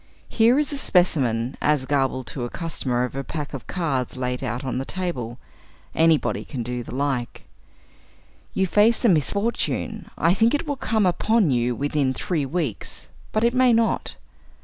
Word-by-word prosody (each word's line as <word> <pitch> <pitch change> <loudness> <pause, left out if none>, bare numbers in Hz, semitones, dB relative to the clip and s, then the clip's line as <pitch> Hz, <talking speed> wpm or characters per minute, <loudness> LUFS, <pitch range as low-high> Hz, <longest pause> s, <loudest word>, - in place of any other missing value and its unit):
Here 235 +3 +4
is 300 0 +1
a 285 - -2
specimen, 130 - +2
as 150 -3 +2
gabbled 135 -2 0
to - - -6
the 120 - -3
customer 130 -7 -2
over 125 +2 -3
a - - -3
pack 150 0 -5
of 135 - -7
cards 135 -9 -2
laid 125 0 -2
out 120 +1 -3
on 130 -1 -2
the - - -2
table; 135 -9 -4 0.6
anybody 160 -1 +2
can 130 -5 -5
do 125 +1 -4
the 120 - -8
like: 135 -3 -2 1.1
"You 190 - +2
face 215 +6 +3
a - - +6
misfortune. 205 - -1
I 165 +2 +3
think 225 +7 +3
it 290 - -2
will 290 -2 -2
come 220 -5 0
upon 200 0 +2
you 120 -1 +1
within 140 -1 0
three 155 -3 -1
weeks, 150 - -4 0.2
but 215 - 0
it 235 +1 +3
may 255 -1 +4
not. 225 0 +1
150 Hz, 170 wpm, -23 LUFS, 130-210 Hz, 1.1 s, a